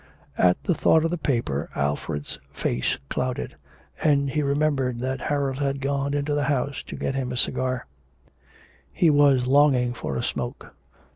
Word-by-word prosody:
At 90 -1 +5
the 180 - +2
thought 160 0 +3
of 165 - 0
the 175 - -1
paper 115 - -1
Alfred's 70 +1 -2
face 60 - -1
clouded, 125 0 -3 0.5
and 140 -3 +2
he 150 - 0
remembered 140 -4 0
that 130 +1 -2
Harold 140 -2 -1
had 140 -1 -1
gone 140 +1 -1
into 145 +1 -1
the 145 -1 +1
house 140 0 -1
to - - -6
get - - -2
him 130 -2 -2
a 125 - -3
cigar: 130 0 0 1.1
he 160 - +3
was 140 -3 +4
longing 130 -2 +4
for - - -4
a 120 - -2
smoke. 120 +2 -4
135 Hz, 160 wpm, -25 LUFS, 125-145 Hz, 1.1 s, At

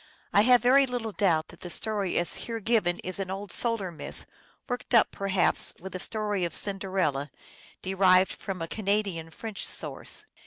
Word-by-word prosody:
I 200 - +7
have 245 +2 +5
very 270 +2 +6
little 240 -3 -3
doubt 175 -6 +1
that - - -15
the 175 - -6
story 205 -1 -2
as 170 -3 0
here 230 -1 -3
given 210 -5 +2
is 185 +1 -1
an 190 -1 -3
old 195 +1 -5
solar 230 -6 +1
myth, 160 - -9 0.4
worked 245 -1 -2
up, 230 - +5
perhaps, 195 -2 0
with 190 +1 -8
the 185 - -4
story 210 -2 -1
of 170 - -1
Cinderella, 185 -8 -1 0.5
derived 185 0 +4
from 185 -4 -5
a - - -4
Canadian 200 -5 -1
French 215 +5 -7
source. - - -5
195 Hz, 170 wpm, -28 LUFS, 185-220 Hz, 0.5 s, I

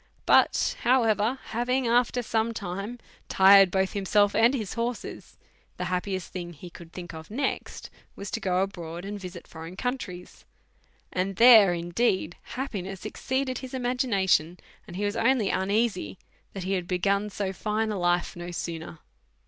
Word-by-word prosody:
But, - - +3
however, 230 -1 +2
having 250 +3 0
after 245 +1 +2
some 225 0 -1
time 200 +4 -5 0.3
tired 195 0 +7
both 190 +1 0
himself 205 +1 +2
and 230 +5 +4
his 215 -7 -4
horses, 235 0 -5 0.4
the - - -3
happiest 185 -1 -3
thing 175 -1 -6
he 170 +3 -11
could 170 -1 -13
tliink 175 -1 -8
of 160 0 -10
next 265 +6 -3 0.2
was 200 - -7
to - - -2
go 185 -3 +1
abroad 175 -2 -6
and 205 +1 -5
visit 180 -2 -9
foreign 165 +2 -9
countries; 200 -7 -5 0.7
and 190 +1 -1
there, 220 -6 +8
indeed, 175 0 0 0.2
happiness 195 -8 -5
exceeded 260 -1 -2
his 260 -1 -7
imagination, 215 - +1 0.3
and 175 - -9
he 205 +2 -2
was 205 +1 -1
only 230 -4 +2
uneasy 195 - 0 0.4
that 195 - -5
he 190 +2 -1
had 180 -2 -2
begun 200 +3 0
so 195 -1 -3
fine 215 +3 -1
a 205 - -3
life 175 0 +1
no 175 0 -7
sooner. 165 -1 -5
195 Hz, 155 wpm, -27 LUFS, 180-230 Hz, 0.7 s, there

